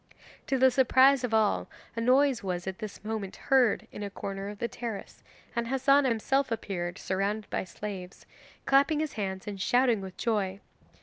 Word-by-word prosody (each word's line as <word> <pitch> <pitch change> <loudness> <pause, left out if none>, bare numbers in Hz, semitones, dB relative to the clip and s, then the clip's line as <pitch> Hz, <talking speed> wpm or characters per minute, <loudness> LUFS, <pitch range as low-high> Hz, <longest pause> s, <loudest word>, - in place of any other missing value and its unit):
To 270 - +1
the 260 0 +5
surprise 265 +1 +5
of 250 - -1
all 155 - +2 0.3
a 230 - -2
noise 260 +1 +3
was 180 -2 -3
at 190 -1 -5
this 215 -3 -7
moment 215 -3 -4
heard 255 -6 +2
in - - -8
a 205 - -3
corner 195 0 -5
of 205 - -8
the 235 - -2
terrace, 230 -3 -7 0.3
and 235 0 -1
Hassan 270 +2 +3
himself 265 +3 +1
appeared 180 -6 -3
surrounded 200 +3 -2
by - - -1
slaves, 190 -1 -8 0.4
clapping 280 +3 +4
his 310 -2 -2
hands 190 -3 -4
and 200 -2 -5
shouting 245 -1 +3
with 190 -1 -9
joy. 200 -4 -1
220 Hz, 175 wpm, -29 LUFS, 195-260 Hz, 0.4 s, the